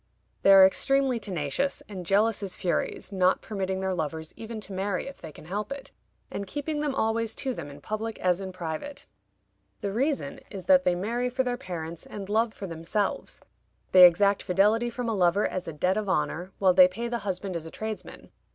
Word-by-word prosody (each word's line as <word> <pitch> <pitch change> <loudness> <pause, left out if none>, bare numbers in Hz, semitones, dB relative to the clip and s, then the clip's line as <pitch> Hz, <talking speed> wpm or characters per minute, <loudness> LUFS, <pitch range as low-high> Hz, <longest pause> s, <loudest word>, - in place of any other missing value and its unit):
They 195 - +6
are 195 -1 +10
extremely 270 +5 +2
tenacious, 195 - -2
and 185 -4 -7
jealous 210 +3 +2
as 195 -3 -4
furies, 180 - -2
not 185 -1 +2
permitting 190 -2 -3
their 190 0 0
lovers 160 -1 -4
even 225 0 -7
to 200 - -8
marry 190 0 -2
if 275 - -10
they 160 - -8
can 150 - -14
help 205 +8 -4
it, 275 -1 -7 0.4
and 200 - -4
keeping 295 +6 -3
them 290 -3 -1
always 225 0 0
to 265 -2 -2
them 155 -9 -7
in 145 0 -12
public 220 +4 -4
as 180 0 +1
in 190 -1 -5
private. 180 - -6 0.8
The 200 - -2
reason 275 +6 -1
is, 195 -4 -7
that 275 -1 +5
they 180 - +3
marry 235 +7 -1
for 260 +1 0
their 245 -1 -1
parents 170 -9 -6
and 200 -1 -7
love 220 +2 +2
for 205 - -8
themselves. 170 +4 -3 0.5
They 180 -1 +11
exact 200 +3 +2
fidelity 210 +6 +2
from 240 0 -4
a 225 - 0
lover 190 +1 +3
as 185 - -4
a - - -3
debt 180 +6 0
of 210 -2 -2
honor, 180 0 -1
while 190 -2 +4
they 180 0 +8
pay 225 +6 -4
the 235 0 -2
husband 190 -2 -4
as 165 -1 -4
a - - -7
tradesman. 220 +4 -7
200 Hz, 205 wpm, -27 LUFS, 180-230 Hz, 0.8 s, They